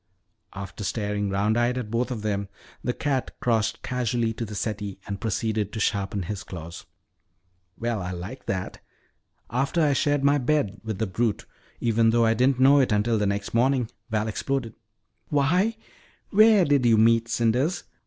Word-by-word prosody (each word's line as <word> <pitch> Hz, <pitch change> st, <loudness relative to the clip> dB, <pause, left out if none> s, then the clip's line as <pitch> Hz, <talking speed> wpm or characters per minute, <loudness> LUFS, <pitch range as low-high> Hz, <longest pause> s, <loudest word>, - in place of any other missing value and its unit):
After 100 Hz, 0 st, -7 dB
staring 105 Hz, -1 st, -2 dB
round 105 Hz, +4 st, +1 dB
eyed 120 Hz, +1 st, +1 dB
at 115 Hz, -4 st, -4 dB
both 120 Hz, +3 st, 0 dB
of 115 Hz, -5 st, -4 dB
them, 100 Hz, -2 st, -2 dB, 0.3 s
the 125 Hz, -, 0 dB
cat 135 Hz, 0 st, -2 dB
crossed 115 Hz, -3 st, 0 dB
casually 120 Hz, -2 st, -1 dB
to 115 Hz, +1 st, -4 dB
the 105 Hz, -1 st, -8 dB
settee 105 Hz, -2 st, -3 dB
and 100 Hz, -1 st, -5 dB
proceeded 110 Hz, -1 st, -1 dB
to 110 Hz, -, -5 dB
sharpen 100 Hz, -1 st, -1 dB
his 100 Hz, +3 st, -5 dB
claws. 85 Hz, -3 st, -9 dB, 0.9 s
"Well, 115 Hz, -3 st, -2 dB
I 90 Hz, -, -4 dB
like 95 Hz, +8 st, -7 dB
that! 95 Hz, -2 st, -3 dB, 0.7 s
After 135 Hz, +7 st, 0 dB
I 150 Hz, -3 st, +3 dB
shared 145 Hz, 0 st, +1 dB
my 145 Hz, +1 st, +4 dB
bed 125 Hz, -6 st, 0 dB
with 110 Hz, -3 st, -4 dB
the 110 Hz, -, 0 dB
brute, 105 Hz, +2 st, -1 dB, 0.3 s
even 115 Hz, -1 st, +3 dB
though 115 Hz, 0 st, +3 dB
I 115 Hz, -, +4 dB
didn't 125 Hz, +3 st, +2 dB
know 140 Hz, +2 st, +6 dB
it 130 Hz, -3 st, +2 dB
until 105 Hz, +2 st, +2 dB
the 105 Hz, -, +1 dB
next 100 Hz, 0 st, -2 dB
morning," 125 Hz, 0 st, +2 dB, 0.2 s
Val 110 Hz, -1 st, 0 dB
exploded. 115 Hz, +1 st, -2 dB, 0.6 s
"Why, 180 Hz, +10 st, +2 dB, 0.5 s
where 215 Hz, -2 st, +6 dB
did 145 Hz, -2 st, +3 dB
you 115 Hz, -2 st, +5 dB
meet 115 Hz, +1 st, +4 dB
Cinders?" 125 Hz, +10 st, +1 dB
115 Hz, 170 wpm, -25 LUFS, 105-130 Hz, 0.9 s, know